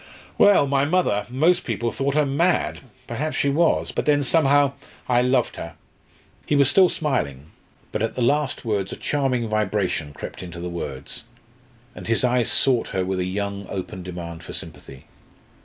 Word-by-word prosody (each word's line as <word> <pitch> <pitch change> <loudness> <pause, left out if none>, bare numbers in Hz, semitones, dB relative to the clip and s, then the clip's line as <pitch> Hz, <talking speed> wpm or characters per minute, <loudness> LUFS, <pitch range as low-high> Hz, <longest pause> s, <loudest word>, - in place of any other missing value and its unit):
Well 200 -8 +6
my 135 0 +2
mother 145 - +1
most 165 +8 +2
people 115 -1 -2
thought 140 +4 -1
her 150 -1 +3
mad 165 +6 +1 0.3
perhaps 150 +6 -3
she 140 - +2
was 165 +4 +2
but - - -2
then 145 -1 +4
somehow 145 -1 +3 0.3
I 125 -1 +3
loved 125 -1 +1
her!" - - -7 0.7
He 145 - +2
was 140 -1 +4
still 185 -2 +6
smiling, 75 - -2 0.4
but - - -2
at 115 - -1
the 125 - 0
last 140 +1 0
words 100 -4 -1
a - - -4
charming 130 -5 -1
vibration 100 -7 -1
crept 75 - -8
into 85 -1 -8
the 90 +1 -4
words, 70 0 -6 0.7
and - - -9
his 115 +1 +2
eyes 125 -2 +2
sought 130 -4 +2
her 95 -1 -2
with 95 0 -2
a 90 - 0
young 100 +1 -3
open 95 -1 -5
demand 85 -2 -7
for - - -9
sympathy. 65 -1 -8
120 Hz, 175 wpm, -23 LUFS, 95-145 Hz, 0.7 s, Well